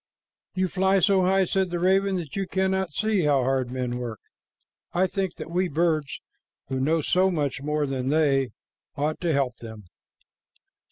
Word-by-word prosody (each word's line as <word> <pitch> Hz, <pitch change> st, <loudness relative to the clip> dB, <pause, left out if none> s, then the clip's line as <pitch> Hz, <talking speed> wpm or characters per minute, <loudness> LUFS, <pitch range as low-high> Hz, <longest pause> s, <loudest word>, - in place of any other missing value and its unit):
"You 185 Hz, 0 st, +1 dB
fly 190 Hz, +1 st, +2 dB
so 195 Hz, 0 st, +4 dB
high," 190 Hz, +1 st, +3 dB
said 190 Hz, 0 st, 0 dB
the 175 Hz, -, -2 dB
raven, 190 Hz, +2 st, +2 dB
"that 165 Hz, -6 st, -5 dB
you 195 Hz, -1 st, -2 dB
cannot 190 Hz, -1 st, 0 dB
see 215 Hz, +4 st, +1 dB
how 145 Hz, -4 st, +3 dB
hard 130 Hz, -1 st, 0 dB
men 125 Hz, -1 st, -3 dB
work. 115 Hz, -4 st, -5 dB, 0.7 s
I 180 Hz, +2 st, +3 dB
think 190 Hz, -1 st, -2 dB
that 160 Hz, 0 st, -8 dB
we 180 Hz, +2 st, +1 dB
birds, 155 Hz, -3 st, 0 dB, 0.5 s
who 130 Hz, -1 st, -2 dB
know 155 Hz, +5 st, +2 dB
so 185 Hz, +5 st, +2 dB
much 145 Hz, -6 st, -2 dB
more 150 Hz, +1 st, 0 dB
than 130 Hz, -2 st, -3 dB
they, 140 Hz, -4 st, +2 dB, 0.5 s
ought 150 Hz, +2 st, -1 dB
to 170 Hz, -2 st, +1 dB
help 135 Hz, -4 st, 0 dB
them." 110 Hz, -2 st, -10 dB
160 Hz, 170 wpm, -25 LUFS, 135-190 Hz, 0.7 s, so